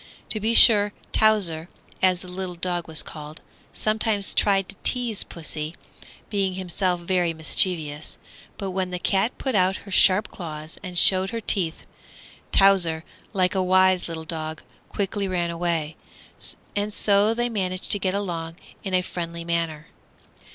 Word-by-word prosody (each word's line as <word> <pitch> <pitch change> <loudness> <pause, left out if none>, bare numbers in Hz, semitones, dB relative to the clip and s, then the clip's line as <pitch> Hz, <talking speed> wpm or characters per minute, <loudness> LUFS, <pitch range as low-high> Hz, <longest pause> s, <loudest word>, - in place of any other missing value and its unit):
To 215 - -2
be 225 +2 +1
sure 205 -3 +8 0.2
Towser, 185 -7 +2 0.3
as 185 -1 +2
the - - -11
little 180 0 -6
dog 175 -1 -3
was 160 -1 0
called, 150 0 -9 0.3
sometimes 215 -2 +1
tried 195 -2 +2
to - - -8
tease 240 -5 0
pussy, 155 -1 -6 0.6
being 195 -3 0
himself 180 -1 -1
very 175 -1 0
mischievous; 155 -2 0 0.4
but 195 -2 -4
when 185 0 -2
the 180 - -4
cat 195 +6 0
put 265 - -3
out 190 -1 +3
her 200 - -10
sharp 190 +2 +5
claws 155 -3 -8
and 180 -2 -7
showed 190 +2 +4
her 230 - -4
teeth, 180 -6 +1 0.7
Towser, 180 -5 +4 0.3
like 185 -3 +1
a 190 - +1
wise 185 0 +3
little 160 -1 -6
dog, 160 -1 -5 0.3
quickly 200 0 -2
ran 175 -2 -1
away, 165 -2 -2 0.8
and 205 +1 -1
so 205 +2 +3
they 240 +1 0
managed 185 -5 -3
to 205 - +3
get 185 0 -1
along 165 -5 -4 0.3
in 190 -2 -1
a 180 - +2
friendly 170 -1 -6
manner. 165 -2 -2
185 Hz, 150 wpm, -24 LUFS, 170-200 Hz, 0.8 s, sure